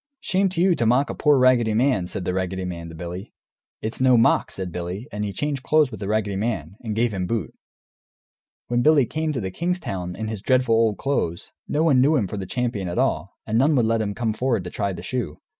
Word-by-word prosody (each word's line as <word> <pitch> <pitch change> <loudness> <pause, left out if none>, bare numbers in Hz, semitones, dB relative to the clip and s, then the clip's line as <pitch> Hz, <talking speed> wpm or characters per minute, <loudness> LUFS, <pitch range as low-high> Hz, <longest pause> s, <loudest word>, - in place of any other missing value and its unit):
"Shame 190 +1 +1
to 180 -2 -4
you 185 0 +5
to 115 - +1
mock 130 +4 +3
a - - -4
poor 145 -1 +3
raggedy 125 -4 +4
man!" 120 -7 +2
said 90 - -4
the 90 - -1
raggedy 95 0 -2
man 85 -2 -6
to 80 - -10
Billy. 90 +5 -7 0.5
"It's 110 +3 -4
no 130 -2 +5
mock," 115 - +3
said 95 -2 -5
Billy, 90 - -5
and 105 0 -3
he 105 - -2
changed 140 +6 -2
clothes 150 -1 +3
with - - -7
the 100 - -4
raggedy 105 -2 0
man, 100 -6 -3
and 110 -3 -4
gave 115 0 +1
him 90 -2 -2
boot. 115 +1 -2 1.1
When 120 0 +1
Billy 150 -1 +5
came 155 +4 -2
to 140 - -2
the 95 -3 -4
king's 180 - -1
town, 95 - -5
in 110 - -4
his 110 -3 -5
dreadful 130 -1 +2
old 110 -2 +3
clothes, 110 -12 -2 0.2
no 150 +2 +1
one 140 -6 +4
knew 145 +4 +4
him 120 -8 +2
for 105 - -6
the 95 -2 -5
champion 115 -6 -2
at 85 - -4
all, - - 0
and 110 +2 +1
none 145 +4 +4
would 120 -4 +3
let 115 0 +1
him 100 -2 -2
come 115 -3 -1
forward 115 -3 0
to 90 - -7
try 100 -1 -1
the 95 - -7
shoe. 120 - -3
115 Hz, 245 wpm, -23 LUFS, 95-130 Hz, 1.1 s, you